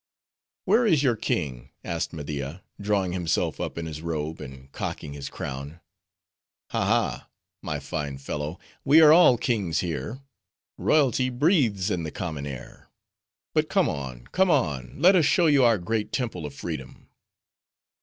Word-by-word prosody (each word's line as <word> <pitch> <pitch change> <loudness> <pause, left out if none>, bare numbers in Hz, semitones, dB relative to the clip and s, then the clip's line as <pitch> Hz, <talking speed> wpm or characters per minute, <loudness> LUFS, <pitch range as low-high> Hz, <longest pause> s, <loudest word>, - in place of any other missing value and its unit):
"Where 240 - +4
is 155 -8 +3
your 125 -4 +3
king?" 70 - -3
asked 85 0 -3
Media, 75 +1 -5 0.2
drawing 100 -3 0
himself 90 -2 -1
up - - -4
in 85 - -3
his 80 -1 -6
robe, 80 -1 -3
and 65 0 -10
cocking 70 +1 -5
his 70 -1 -6
crown. 70 +4 -6 0.9
"Ha, - - 0
ha, - - 0 0.3
my - - -3
fine 70 -3 -4
fellow! 75 +4 -4 0.3
We 145 +3 +6
are 155 -1 +9
all 165 -7 +7
kings 105 -9 0
here; 100 - -4 0.5
royalty 130 -4 +2
breathes 125 - +2
in 90 - -1
the 80 - -4
common 75 -5 -5
air. 65 -3 -9 0.6
But - - +1
come - - +3
on, 65 -4 -5
come 190 0 +3
on. 70 - 0
Let 185 +5 +6
us 170 -5 +4
show 170 +4 +3
you 145 -4 +5
our 115 -2 +5
great 105 +4 -2
Temple 110 - -3
of 70 - -11
Freedom." 70 -4 -7
85 Hz, 155 wpm, -26 LUFS, -, 0.9 s, are